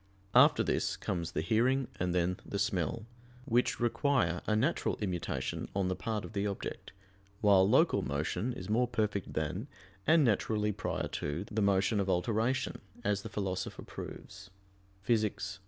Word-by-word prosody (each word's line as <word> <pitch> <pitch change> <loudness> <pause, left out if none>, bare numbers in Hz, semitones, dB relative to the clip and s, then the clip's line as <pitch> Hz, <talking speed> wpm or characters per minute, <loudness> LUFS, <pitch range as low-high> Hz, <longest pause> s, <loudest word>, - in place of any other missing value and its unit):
After - - +6
this - - 0
comes 85 -2 -3
the - - 0
hearing 120 +9 +2
and 90 0 0
then 90 +1 +1
the 100 - -4
smell, 100 +2 -1 0.4
which 120 +2 +1
require 120 -7 +1
a 110 - +2
natural 135 +10 +1
immutation 90 -5 -3
on 95 -2 +1
the 95 - 0
part 110 -1 -3
of - - -10
the 100 0 0
object; 100 - -5 0.5
while 100 -2 +5
local - - +4
motion 80 - -2
is 125 - -7
more 120 +4 +2
perfect 105 -5 -1
than, 90 - -2 0.4
and 160 0 +6
naturally 105 -1 +1
prior - - -3
to, 75 +5 -3
the 110 0 0
motion 100 +1 +3
of 100 -1 0
alteration, 115 +8 0 0.2
as 105 -3 +1
the 110 - -7
Philosopher 95 -3 -3
proves 100 +2 -9 0.6
(Phys. 105 -4 0
100 Hz, 155 wpm, -32 LUFS, 95-115 Hz, 0.6 s, After